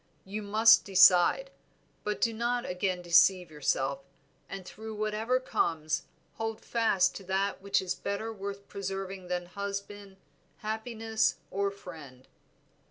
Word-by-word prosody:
You 205 +3 -5
must 215 +2 +6
decide, 190 - +5 0.5
but 210 0 -2
do 230 - +1
not 240 +2 -1
again 180 0 -2
deceive 175 0 +4
yourself, 140 -2 -1 0.5
and 195 -2 -7
through 220 +3 -8
whatever 215 +4 0
comes 160 -10 -1 0.3
hold 225 -1 -4
fast 210 -6 +2
to 195 - -10
that 190 +1 -1
which 200 -1 +1
is 180 - -1
better 210 +3 -4
worth 200 -1 -7
preserving 195 -1 -5
than 180 0 -2
husband, 200 +1 -6 0.4
happiness, 220 0 -1 0.2
or 200 +1 0
friend." 155 -10 -12
200 Hz, 125 wpm, -30 LUFS, 180-220 Hz, 0.5 s, must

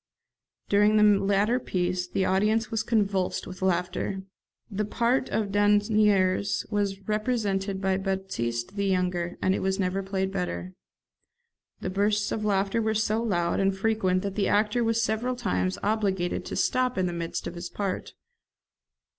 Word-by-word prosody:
During 210 +1 +4
the 210 -2 +5
latter 205 +5 +2
piece 180 -4 -1
the 190 +1 0
audience 215 +3 +1
was 225 -1 0
convulsed 200 -4 0
with 185 0 -9
laughter. 190 +1 -1 0.4
The 210 -1 -2
part 240 +5 0
of 210 -3 -1
Dasnieres 205 -2 +2
was 200 -2 0
represented 210 -3 -1
by 190 -1 +1
Batiste 190 - -3
the 200 -1 0
younger, 180 -2 0
and 190 - +3
it - - -1
was 190 +1 -1
never 190 0 0
played 190 0 -2
better. 95 - -3 1.1
The 185 - -3
bursts 205 +2 +1
of 215 - -2
laughter 200 +1 +1
were 220 0 0
so 215 +1 +1
loud 175 -7 0
and 195 0 +1
frequent 190 -3 +1
that 200 -1 -3
the 200 0 0
actor 210 +3 +2
was 230 0 +1
several 225 +3 -1
times 90 - -1
obliged 200 -4 0
to - - -5
stop 255 -2 +1
in 185 - +2
the 175 - -2
midst 170 -1 -4
of - - -4
his 175 0 -6
part. 195 -2 -4
195 Hz, 155 wpm, -27 LUFS, 185-215 Hz, 1.1 s, the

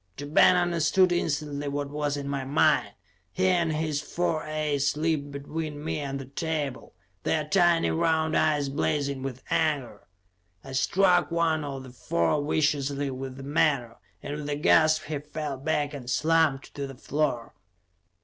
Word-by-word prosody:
Ja 145 - -6
Ben 155 +4 +5
understood 175 +1 +3
instantly 145 -4 -1
what 140 0 -3
was 145 -1 -1
in 140 -1 -5
my 140 -1 -2
mind. 135 +2 +2 0.4
He 185 - 0
and 170 -3 +2
his 155 -1 -1
four 165 0 -1
aides 150 -2 0
leaped 155 -2 0
between 150 +1 -5
me 155 - -2
and 140 -1 -3
the 135 - -7
table, 145 - -4 0.3
their 155 - 0
tiny 175 -2 +3
round 160 -1 +1
eyes 150 -2 +2
blazing 140 -1 -1
with 130 -1 -6
anger. 145 -9 -1 0.6
I 135 - -10
struck 180 +6 +3
one 165 -2 +1
of 135 -2 -5
the 130 - -11
four 120 - 0
viciously 145 -2 0
with 130 0 -6
the 135 - -8
menore, 140 -4 +1 0.3
and 145 +1 -4
with 150 -1 -5
a 145 - 0
gasp 155 +1 +4
he 150 -1 -4
fell 150 -1 -5
back 145 +1 -1
and 130 -4 -7
slumped 155 -1 +1
to 140 -1 -4
the 135 - -9
floor. 140 -3 -2
150 Hz, 160 wpm, -27 LUFS, 140-160 Hz, 0.6 s, Ben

